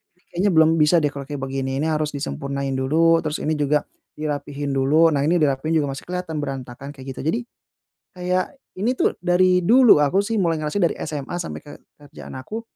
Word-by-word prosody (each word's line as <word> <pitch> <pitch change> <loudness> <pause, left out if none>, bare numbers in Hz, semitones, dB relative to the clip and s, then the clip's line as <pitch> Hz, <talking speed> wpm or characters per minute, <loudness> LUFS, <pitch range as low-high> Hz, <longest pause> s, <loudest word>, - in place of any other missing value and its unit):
"Ini 180 - -36
kayaknya 195 +2 +2
belum 160 +1 +5
bisa 150 +3 +5
deh - - +4
kalau 140 0 -6
kayak 145 -2 -5
begini, 135 0 -3
ini - - 0
harus 155 -1 0
disempurnain 140 - -3
dulu 165 +5 +3
terus 155 0 -3
ini 155 +1 0
juga 150 0 +1 0.4
dirapihin 145 -1 -3
dulu. 150 +5 +4
Nah, 140 -2 +1
ini 175 +3 +3
dirapihin 150 +2 +1
juga 145 - -1
masih - - -9
kelihatan 180 -4 -4
berantakan," 135 0 -6
kayak 135 0 -11
gitu. - - -9
Jadi 225 +9 +1 0.8
kayak 180 +3 -1 0.3
ini 235 +5 +1
tuh - - +1
dari 180 0 +3
dulu 245 - +7
aku 165 +8 +3
sih 220 +2 -2
mulai 165 -2 +1
ngerasa 150 +6 -2
dari 170 - +3
SMA 150 +2 -4
sampai 170 - -6
ke 145 - -10 0.3
kerjaan 145 -2 -12
aku, 215 +13 -6
150 Hz, 200 wpm, -22 LUFS, 140-175 Hz, 0.8 s, dulu